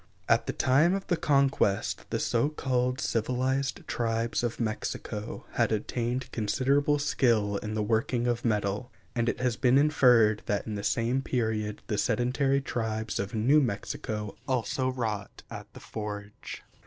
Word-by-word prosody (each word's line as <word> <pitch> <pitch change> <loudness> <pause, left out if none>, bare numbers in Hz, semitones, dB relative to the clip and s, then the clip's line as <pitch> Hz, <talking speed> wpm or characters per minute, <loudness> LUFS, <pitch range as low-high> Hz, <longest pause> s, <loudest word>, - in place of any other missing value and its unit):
At - - +3
the - - -1
time 150 +8 +3
of 195 - -4
the 175 - +1
Conquest 140 -10 +1
the - - -1
so 120 +5 +1
called 125 -3 -1
civilized 130 +4 -1
tribes 115 0 -1
of 120 -1 -2
Mexico 110 -1 -4
had - - +1
attained 120 +4 -2
considerable 140 +6 +1
skill 115 -8 +2
in 105 +1 -4
the 105 - 0
working 115 +3 0
of 120 -1 0
metal, 105 +2 -1 0.2
and 120 -1 +1
it - - -3
has 125 -2 0
been 130 0 +4
inferred 125 -7 +5
that 105 - 0
in 110 - -4
the 100 - -3
same 120 +4 +1
period 110 -5 -2
the 105 - -1
sedentary 135 +5 +1
tribes 110 -4 -3
of 100 +4 -3
New 135 +8 +4
Mexico 105 -2 -3
also 130 +1 0
wrought 110 -6 -4
at - - -8
the - - -9
forge. 105 -1 -7
120 Hz, 155 wpm, -28 LUFS, 110-130 Hz, 0.2 s, inferred